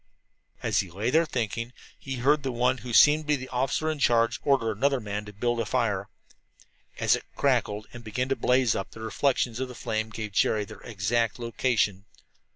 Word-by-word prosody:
As - - +2
he 95 - -2
lay 105 +8 -2
there 165 +2 +3
thinking, 115 -1 -3 0.3
he 135 -1 -5
heard 140 +4 +2
the 135 -1 -2
one 125 +2 +1
who 120 +2 -7
seemed 150 +6 +6
to - - -18
be 150 - +3
the 130 -2 -7
officer 130 +5 -1
in 155 - -5
charge 115 -3 +3
order 130 -6 +2
another 135 +6 +1
man 105 -1 -4
to 105 - -9
build 120 +4 -1
a 115 - 0
fire. 105 -5 0 0.9
As - - +3
it - - -6
crackled 105 +1 +1
and 120 -1 -9
began 115 +4 -2
to 135 - +2
blaze 125 -3 +2
up, 95 - -3
the - - -13
reflection 125 +2 0
of 130 - -1
the 125 - -10
flame 110 -1 -2
gave 110 -1 -6
Jerry 105 +2 +2
their - - -12
exact 115 +1 -1
location. 115 -4 0
120 Hz, 200 wpm, -27 LUFS, 110-130 Hz, 0.9 s, seemed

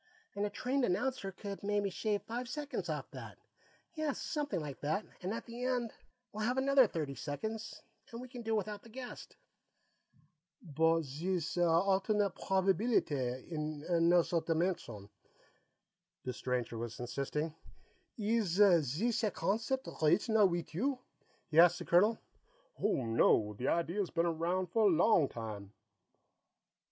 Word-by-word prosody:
"And 205 +1 -1
a - - -5
trained 260 +5 -1
announcer 205 +1 0
could 200 +1 -7
maybe 205 -1 0
shave 210 +1 -1
five 240 +2 -5
seconds 295 +2 -4
off - - -4
that. - - -9 0.6
Yes, 310 -4 -2
something 295 - -2
like 145 -4 -6
that, 155 +8 -1 0.2
and 185 +2 -3
at 230 - -4
the 235 +1 -7
end 250 -3 -1 0.4
we'll 215 +1 -3
have 245 +4 0
another 270 -2 +5
thirty 155 -7 -3
seconds, 215 +12 -5 0.3
and 230 - -7
we 255 - -8
can 245 -1 -8
do 225 -1 -1
without 210 -1 -3
the 230 - -15
guest." 250 +2 -9 1.2
"But 165 - +2
zees 165 +5 -2
alternate 190 +4 +2
probibeelitay, 190 - 0
in 150 -2 -4
anozzer 170 -1 +3
dimension," 165 - -1 1.2
the 125 - -3
stranger 125 -2 -2
was 115 -1 -5
insisting. 140 +5 -3 0.6
"Ees 210 -4 0 0.3
zees 210 - 0
a 215 - +3
concept 220 +10 -1
original 200 +7 +4
weet 175 -2 -3
you?" 260 - 0 0.5
he 155 - +4
asked 175 +1 +7
the 175 - -7
colonel. 210 +6 +4 0.6
"Oh, 200 - +1
no; 115 -2 +3
that 125 +6 -4
idea's 170 +3 0
been 170 0 0
around 170 +2 -1
for 225 +1 +3
a 180 - +4
long 170 -4 +4
time." 105 -3 -7
185 Hz, 140 wpm, -34 LUFS, 160-225 Hz, 1.2 s, asked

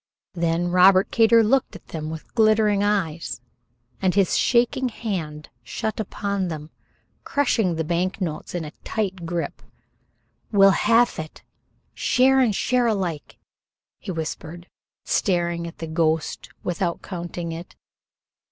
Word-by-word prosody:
Then 170 0 0
Robert 185 +2 +5
Kater 230 0 +5
looked 260 +4 +1
at - - -13
them 155 -1 -5
with 160 0 -8
glittering 215 -2 +3
eyes, 175 - -1 0.6
and 185 -1 +1
his 195 -3 +3
shaking 245 +2 +2
hand 165 -10 -5
shut 220 - -4
upon 200 -2 -2
them, 155 -2 -6 0.5
crushing 225 -10 +1
the 160 - -1
bank 175 +5 -1
notes 170 -2 -4
in 170 -3 -3
a 150 - -7
tight 190 -5 -3
grip. 170 0 -3 0.9
"We'll 195 -2 +6
halve 230 +2 +3
it, 155 0 -8 0.5
share 265 +1 +3
and 235 -6 +3
share 250 +2 +2
alike," 185 -8 -2 0.6
he - - -10
whispered, 165 +1 -5 0.4
staring 170 -3 0
at 165 - -10
the 165 - -5
ghost 160 -1 -1
without 175 -1 -2
counting 175 -2 -5
it. 165 +2 -8
180 Hz, 130 wpm, -23 LUFS, 165-215 Hz, 0.9 s, We'll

